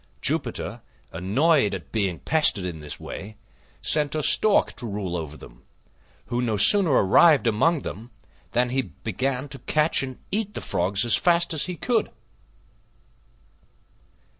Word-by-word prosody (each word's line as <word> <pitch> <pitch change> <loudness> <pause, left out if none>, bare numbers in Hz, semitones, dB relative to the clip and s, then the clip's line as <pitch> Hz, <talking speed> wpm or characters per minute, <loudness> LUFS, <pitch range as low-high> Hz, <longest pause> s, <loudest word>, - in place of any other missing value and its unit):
Jupiter, - - -2 0.3
annoyed 105 - +2
at 85 -7 -10
being 100 -6 -1
pestered 150 -11 +1
in 85 -3 -5
this 75 -1 -8
way, 105 +3 -8 0.5
sent 150 -1 +1
a 155 - -1
Stork 215 +7 +3
to 120 - -6
rule 100 -4 -4
over 75 -3 -5
them, - - -15 0.6
who 120 0 -2
no 115 -4 -1
sooner 195 - +4
arrived 140 - +5
among 140 +9 +2
them 115 +4 -7 0.4
than 125 +2 +1
he 135 +1 +1
began 130 +4 -4
to 135 - -9
catch 150 +6 +1
and 130 -2 -6
eat 210 0 -2
the - - -3
Frogs 95 +5 0
as 120 - +3
fast 170 -1 +2
as 155 - -1
he 180 - -4
could. 230 +4 0
125 Hz, 145 wpm, -24 LUFS, 100-155 Hz, 0.6 s, arrived